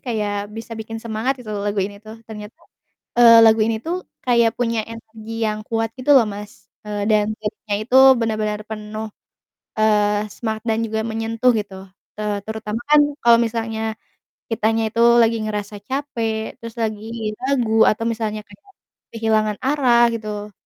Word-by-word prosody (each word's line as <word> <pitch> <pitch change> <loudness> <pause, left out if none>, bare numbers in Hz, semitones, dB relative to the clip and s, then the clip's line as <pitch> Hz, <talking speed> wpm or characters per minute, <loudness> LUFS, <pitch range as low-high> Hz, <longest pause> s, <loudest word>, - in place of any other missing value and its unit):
kayak 205 -4 -3
bisa 225 +1 -8
bikin 225 +1 -6
semangat, 225 +3 -1
gitu 215 -3 -7
lagu 205 0 -2
ini 200 +1 -8
tuh, 220 +1 -11
ternyata, 210 +1 -10 0.6
eee, 230 -1 +9
lagu 220 0 +5
ini 225 +1 +1
tuh 355 +5 -4 0.2
kayak 235 -2 +3
punya 230 -2 0
energi 225 0 -7
yang 215 0 -2
kuat 225 -1 -1
gitu 255 +3 -1
loh, 250 - +6
Mas, 205 0 -7 0.3
eee, 205 -1 -3
dan 210 -1 +3
vibe-nya 210 -1 -4
itu 250 +3 +1 0.2
benar-benar 215 -2 -1
penuh, 215 0 -6 0.7
eee, 210 -1 +2
semangat 220 -2 -4
dan 220 0 +1
juga 220 0 -2
menyentuh 225 +2 +1
gitu, 205 -2 -4 0.5
eee, 210 -1 -1
terutama 220 0 -4
kan 300 0 +7 0.2
kalo 235 -1 +7
misalnya 225 -1 -2 0.6
kitanya 225 0 +1
itu 230 - -3 0.2
lagi 230 0 +3
ngerasa 210 -1 -4
capek, 230 -6 -3
terus 230 -2 -9
lagi 220 0 -3
lagu 240 -5 +2
atau 215 - -1
misalnya 220 -2 -2
kayak 255 - -19 0.5
kehilangan 215 -2 +1
arah, 250 -4 +4
gitu, 210 -2 -5
220 Hz, 150 wpm, -21 LUFS, 215-230 Hz, 0.7 s, eee